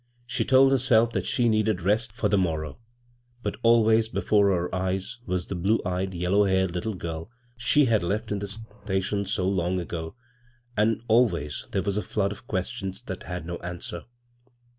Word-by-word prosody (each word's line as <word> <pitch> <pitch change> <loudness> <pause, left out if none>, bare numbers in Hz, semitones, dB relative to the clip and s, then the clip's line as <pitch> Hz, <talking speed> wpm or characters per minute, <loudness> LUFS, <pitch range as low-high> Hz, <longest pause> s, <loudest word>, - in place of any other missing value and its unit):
She 125 -1 -1
told 135 +2 +5
herself 120 -3 +4
that - - -2
she 120 -2 +2
needed 110 -4 +1
rest 105 +4 +1
for 110 -1 -1
the 100 - +2
morrow; 80 -5 -1 0.6
but 105 - -3
always 115 -1 +4
before 105 -3 +2
her 90 -3 0
eyes 95 +6 -2
was 90 -1 -1
the - - -5
blue 95 +5 +1
eyed, 90 +1 -2
yellow 90 +4 +2
haired 95 -2 +1
Uttle 100 +3 -3
girl 80 +1 -5 0.3
she 140 +4 +4
had 115 -4 +3
left 105 +5 -2
in 105 - -1
the 100 - -4
station 100 -2 -3
so 95 -1 -1
long 90 -1 0
ago, 80 0 -5 0.6
and 110 +2 +1
always 105 -11 +2
there - - 0
was 100 0 -1
a - - +1
flood 100 +1 -1
of 120 +4 -10
questions 95 0 -3
that 95 - -6
had 90 -2 -4
no 85 0 -4
answer. 85 0 -6
100 Hz, 180 wpm, -26 LUFS, 90-110 Hz, 0.6 s, told